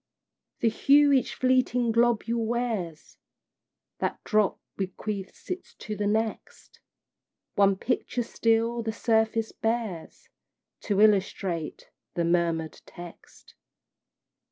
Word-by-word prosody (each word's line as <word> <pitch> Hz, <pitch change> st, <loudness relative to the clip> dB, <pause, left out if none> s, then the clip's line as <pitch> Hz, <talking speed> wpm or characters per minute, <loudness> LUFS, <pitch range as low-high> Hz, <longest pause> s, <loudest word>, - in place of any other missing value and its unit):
The 230 Hz, -, +4 dB
hue 285 Hz, +5 st, +5 dB
each 265 Hz, -2 st, +2 dB
fleeting 255 Hz, -2 st, +2 dB
globule 235 Hz, 0 st, +2 dB
wears, 220 Hz, -9 st, -3 dB, 0.8 s
That -, -, -1 dB
drop 215 Hz, -2 st, +1 dB, 0.2 s
bequeaths 195 Hz, -, -5 dB
it 365 Hz, +1 st, -6 dB
to 215 Hz, -, -5 dB
the 205 Hz, 0 st, -1 dB
next, 220 Hz, +1 st, -3 dB, 0.7 s
One 200 Hz, -1 st, +4 dB
picture 245 Hz, +3 st, -1 dB
still 230 Hz, +1 st, +1 dB
the 220 Hz, -1 st, -3 dB
surface 220 Hz, 0 st, +1 dB
bears, 225 Hz, -7 st, -3 dB, 0.6 s
To 205 Hz, -1 st, +2 dB
illustrate 195 Hz, -5 st, +1 dB, 0.2 s
the 170 Hz, -, +1 dB
murmured 170 Hz, -2 st, 0 dB
text. 175 Hz, -1 st, -13 dB
220 Hz, 100 wpm, -27 LUFS, 195-235 Hz, 0.8 s, hue